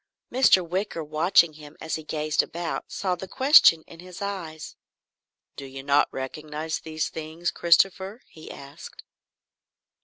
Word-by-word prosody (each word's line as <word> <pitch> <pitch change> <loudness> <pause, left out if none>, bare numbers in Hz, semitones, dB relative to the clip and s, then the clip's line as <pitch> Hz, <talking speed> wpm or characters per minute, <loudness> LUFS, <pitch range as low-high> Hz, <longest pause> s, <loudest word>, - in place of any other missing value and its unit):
Mr. 230 -9 +4
Wicker, 180 -2 -3
watching 160 +2 +3
him 150 0 -14
as 160 - -6
he 160 - -3
gazed 155 0 0
about, 170 0 -5
saw 185 -2 -2
the 180 +2 -6
question 260 - +6
in 165 - -15
his 180 0 -11
eyes. 180 -6 -6 0.8
"Do - - -8
you 135 0 -9
not 140 +1 +3
recognise 150 +4 -5
these 155 -1 -3
things, 160 +2 -5
Christopher?" 190 +5 +2
he 155 - -13
asked. 140 +1 -11
160 Hz, 135 wpm, -25 LUFS, 155-185 Hz, 0.8 s, question